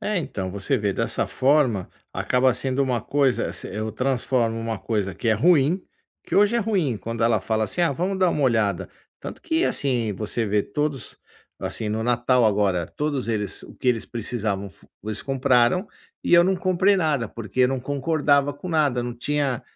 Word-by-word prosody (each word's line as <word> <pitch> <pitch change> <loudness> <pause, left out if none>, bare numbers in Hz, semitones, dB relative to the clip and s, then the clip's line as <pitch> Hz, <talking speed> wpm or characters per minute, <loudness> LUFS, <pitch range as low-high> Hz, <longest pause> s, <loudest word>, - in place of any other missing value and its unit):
É 210 -2 -1
então, 95 - -4
você 100 +8 -1
vê 105 -4 0
dessa - - -1
forma, 130 -8 +2 0.2
acaba 130 +1 +2
sendo 130 +1 -1
uma 125 -3 0
coisa 135 +1 +1
se - - -6
eu 110 +2 -4
transformo 125 -1 0
uma 115 -2 -3
coisa 100 -5 -2
que 115 - -3
é - - +5
ruim, 160 - +3 0.4
que - - -5
hoje 205 +3 +4
é - - +2
ruim 195 - 0
quando 115 +3 -4
ela 115 -2 +3
fala 110 +3 0
assim: 175 - -4
"Ah 165 - +3
vamos 185 +7 -2
dar 185 -2 +3
uma 150 - -1
olhada". 110 -7 +1 0.3
Tanto - - -8
que 335 +1 0
assim 120 -6 0
você 110 +4 -2
vê 105 0 +1
todos 150 -5 -3 0.4
assim 110 - -4
no 110 +1 -1
Natal 120 +1 +2
agora, 100 -5 +2
todos 145 - -3
eles 105 -3 -2
o - - -12
que 130 - -2
eles 115 -3 +1
precisavam 110 -4 -3
fu - - -16 0.2
eles 110 0 -4
compraram 135 - +2 0.4
e - - +3
eu 170 0 +7
não 190 +1 +2
comprei 185 +2 +2
nada 150 - 0
porque 115 +2 -5
eu 125 - +5
não 135 -1 -2
concordava 145 +1 +1
com 145 +6 -9
nada, 145 -7 +1
não 120 0 -4
tinha 140 0 -1
125 Hz, 190 wpm, -23 LUFS, 110-150 Hz, 0.4 s, eu